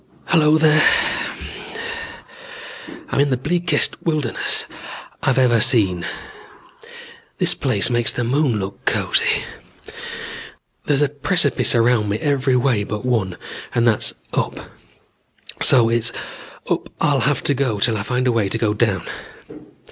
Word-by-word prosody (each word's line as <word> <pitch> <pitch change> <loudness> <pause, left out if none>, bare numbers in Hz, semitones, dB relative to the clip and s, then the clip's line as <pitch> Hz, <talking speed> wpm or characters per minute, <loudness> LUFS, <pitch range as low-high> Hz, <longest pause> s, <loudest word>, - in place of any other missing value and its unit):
"Hello 155 -2 +4
there. 155 0 +4 2.3
I'm - - -1
in 145 0 +3
the 130 - +1
bleakest 170 +3 0
wilderness 155 -8 -1 0.6
I've 135 -1 +1
ever 120 -3 +3
seen. 105 -8 +3 1.3
This - - +4
place 125 -4 0
makes 120 -1 +1
the 120 - -3
moon 130 -1 +1
look 100 -1 -6
cozy. - - +1 1.4
There's 145 0 +2
precipice 160 -9 +2
around 115 -2 +2
me 105 - -1
every 135 -1 0
way 125 -4 +1
but 105 +3 -5
one 105 -8 -1 0.4
and 120 -1 +2
that's 115 -3 +2 0.2
up. - - -3 0.9
So 120 -3 +6
it's 115 0 0 0.6
up - - -2
I'll - - +2
have - - 0
to - - +2
go 130 -6 -1
till 115 +2 +2
I 105 - -2
find 125 +4 -2
a 125 - +3
way 110 -4 0
to 105 - -2
go 110 -2 0
down. 105 -4 0
120 Hz, 130 wpm, -20 LUFS, 110-140 Hz, 2.3 s, So